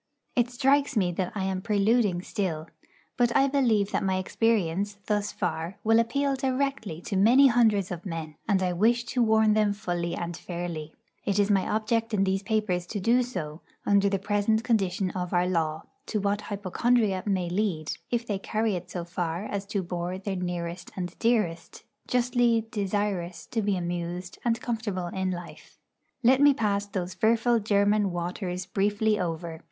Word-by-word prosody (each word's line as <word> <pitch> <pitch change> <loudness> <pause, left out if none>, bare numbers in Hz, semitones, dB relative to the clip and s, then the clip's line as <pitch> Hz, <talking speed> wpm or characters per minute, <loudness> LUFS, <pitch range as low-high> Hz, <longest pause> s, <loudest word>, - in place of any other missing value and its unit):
It 240 -1 +2
strikes 270 +1 +2
me 180 -4 +2
that 180 +1 -2
I 195 - -1
am 190 -1 -1
preluding 205 -3 +2
still. 165 -7 -3 0.5
But 240 -1 +2
I 275 0 +4
believe 235 -8 +2
that - - 0
my 190 -1 +1
experience, 200 -1 0
thus 210 -1 0
far, 170 0 -3
will 225 +1 +5
appeal 280 +4 +1
directly 260 - -2
to 195 - -4
many 235 +8 +6
hundreds 220 -6 +3
of 175 -1 -5
men; 165 -4 -5
and 195 -3 +2
I 180 -1 0
wish 235 +6 +3
to 245 +1 -1
warn 220 -1 +4
them 210 -1 +2
fully 175 -4 -3
and 170 0 -4
fairly 170 -3 -6 0.3
it 200 -1 0
is 205 0 +3
my 195 -2 +2
object 225 +1 0
in 195 - +2
these 190 0 +1
papers 200 -5 -1
to 205 - -4
do 235 +6 +3
so 170 -11 -5 0.2
under 200 0 +4
the 195 - +1
present 205 +3 +1
condition 195 -5 +1
of 180 -1 -4
our 175 0 +3
law, 160 -3 -1 0.2
to 215 - -1
what 200 +1 0
hypochondria 205 +1 +1
may 190 -3 0
lead, 175 -4 -1
if 240 -1 -1
they 205 -4 -2
carry 215 +1 -1
it 180 0 -6
so 175 -1 -4
far 175 +1 -3
as 200 -1 -4
to 200 -1 -2
bore 175 +1 -3
their 195 0 -4
nearest 175 -1 -4
and 180 -1 -4
dearest, 210 -8 0 0.2
justly 245 -2 +2
desirous 195 -4 -2
to 225 - -2
be 200 -2 0
amused 175 +1 -4
and 230 -1 0
comfortable 220 -6 -2
in 190 +1 -2
life. 175 -1 -8 0.5
Let 260 +3 +5
me 285 -1 +6
pass 205 -3 0
those 185 -2 -4
fearful 230 +4 +3
German 205 -1 +2
waters 180 +1 -3
briefly 205 +3 +1
over. 165 -2 -3
200 Hz, 175 wpm, -27 LUFS, 180-225 Hz, 0.5 s, many